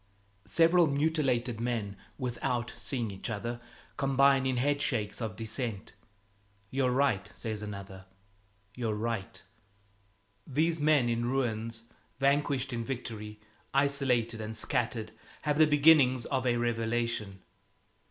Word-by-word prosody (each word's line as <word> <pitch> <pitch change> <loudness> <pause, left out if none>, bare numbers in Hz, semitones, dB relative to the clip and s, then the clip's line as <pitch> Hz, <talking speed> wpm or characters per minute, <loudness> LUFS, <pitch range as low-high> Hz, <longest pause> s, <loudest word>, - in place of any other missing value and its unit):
Several 170 0 +5
mutilated 140 -6 +1
men, 115 -4 -2 0.2
without 120 -2 -2
seeing 120 -6 -3
each 95 +3 -6
other, 120 +2 -4 0.4
combine 135 -1 +4
in 130 -1 0
head 145 +3 +1
shakes 120 -7 -1
of 110 -4 -3
dissent 110 -1 -4 0.8
"You're 130 -1 +1
right," 125 -7 +1
says 110 -2 -4
another, 100 -2 -8 0.7
"you're 115 -2 -2
right." 110 -2 -3 1.0
These 160 +4 +1
men 145 -4 +4
in 120 0 0
ruins, 115 -3 -1 0.3
vanquished 140 -1 +1
in 115 -1 -2
victory, 110 -4 -6 0.4
isolated 130 -5 +1
and 110 0 -5
scattered, 115 -2 -2 0.3
have 150 0 0
the 155 - +7
beginnings 145 -4 +5
of 130 -2 -1
a 120 -1 +2
revelation. 115 -4 -1
120 Hz, 115 wpm, -30 LUFS, 110-140 Hz, 1.0 s, the